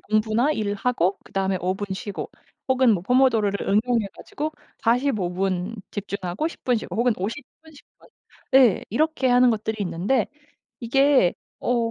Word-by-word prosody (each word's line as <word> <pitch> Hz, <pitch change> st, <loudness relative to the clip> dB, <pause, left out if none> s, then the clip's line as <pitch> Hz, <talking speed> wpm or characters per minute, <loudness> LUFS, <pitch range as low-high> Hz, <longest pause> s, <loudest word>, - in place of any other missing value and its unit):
공부나 215 Hz, +6 st, +1 dB
일하고 205 Hz, -, 0 dB
그다음에 195 Hz, -1 st, -1 dB
5 185 Hz, +1 st, 0 dB
분 205 Hz, +1 st, -5 dB
쉬고 200 Hz, +1 st, -6 dB, 0.4 s
혹은 260 Hz, -2 st, +4 dB
뭐 175 Hz, -, -3 dB
포모도로를 225 Hz, -4 st, +2 dB
응용해 225 Hz, +1 st, +2 dB
가지고 310 Hz, +2 st, -5 dB, 0.3 s
45 230 Hz, -6 st, +1 dB
분 190 Hz, +3 st, -2 dB
집중하고 200 Hz, -, -3 dB
10 -, -, -14 dB
분 250 Hz, -2 st, +2 dB
쉬고 190 Hz, -4 st, -5 dB
혹은 240 Hz, +2 st, +3 dB
50 220 Hz, +10 st, -4 dB, 0.2 s
분, 320 Hz, -1 st, -16 dB
10 290 Hz, -, -16 dB, 0.2 s
분 -, -, -20 dB, 0.5 s
예 255 Hz, -7 st, +5 dB
이렇게 305 Hz, +4 st, +1 dB
하는 250 Hz, 0 st, +5 dB
것들이 220 Hz, 0 st, -2 dB
있는데 195 Hz, +7 st, 0 dB, 0.5 s
이게 265 Hz, -4 st, +3 dB, 0.2 s
어 235 Hz, -2 st, 0 dB
225 Hz, 270 characters per minute, -24 LUFS, 195-255 Hz, 0.5 s, 예